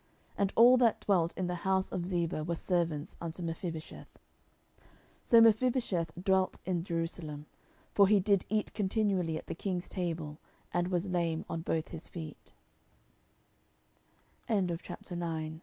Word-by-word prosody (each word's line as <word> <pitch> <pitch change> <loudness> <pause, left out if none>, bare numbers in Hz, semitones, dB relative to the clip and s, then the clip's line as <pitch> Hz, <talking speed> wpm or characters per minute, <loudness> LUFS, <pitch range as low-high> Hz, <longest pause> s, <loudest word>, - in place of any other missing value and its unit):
And 200 -1 +1
all 245 +3 +8
that 240 -3 +3
dwelt 175 -4 +2
in 185 - -1
the 180 - -2
house 190 0 +1
of 175 -1 -2
Ziba 170 -4 -1
were 170 +2 -1
servants 165 -3 -1
unto 170 +1 -4
Mephibosheth. 165 -1 -5
10:009:013 - - -34 0.3
So 230 -1 +6
Mephibosheth 225 -7 +3
dwelt 190 -1 +2
in 180 -3 -1
Jerusalem: 165 -4 -3 0.5
for 200 -1 +6
he 205 0 +5
did 200 0 +3
eat 215 -1 -1
continually 190 -5 0
at - - -8
the - - -4
king's 180 0 -3
table; 165 -4 -4 0.3
and 175 0 +1
was 180 +1 -1
lame 170 -3 -1
on 165 - -3
both 160 -1 -2
his 165 -1 -8
fee 160 -4 -7
180 Hz, 135 wpm, -32 LUFS, 165-195 Hz, 0.5 s, all